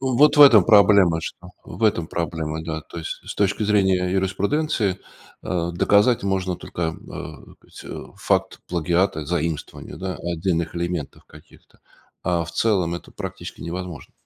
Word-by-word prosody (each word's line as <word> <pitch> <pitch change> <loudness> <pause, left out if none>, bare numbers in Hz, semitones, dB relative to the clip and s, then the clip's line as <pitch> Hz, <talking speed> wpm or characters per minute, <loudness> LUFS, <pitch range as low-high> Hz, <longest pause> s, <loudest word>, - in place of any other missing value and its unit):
Вот 135 +3 +4
в - - +6
этом 115 -9 +8
проблема, 100 -6 +5
что, 90 +2 -8
в 115 - -4
этом 100 -7 +2
проблема, 80 -2 -3
да. 80 -1 -4
То 85 - -10
есть, 80 - -6
с - - -7
точки 100 +1 +1
зрения 95 -3 +2
юриспруденции, 100 - 0 0.5
э, 85 -2 -1
доказать 105 +5 +3
можно 95 -2 -1
только, 85 - -7
э, 80 -1 -1 0.7
так - - -25
сказать, - - -9
факт - - 0
плагиата, 85 0 0
заимствование, 85 -2 -4
да, 95 -2 -4
отдельных 85 -1 -2
элементов 85 -4 -4
каких-то, - - -19 0.4
а 85 -2 +1
в 85 - -8
целом 90 -4 +1
это - - -13
практически - - -8
невозможно. 90 -2 -6
90 Hz, 145 wpm, -22 LUFS, 85-100 Hz, 0.7 s, этом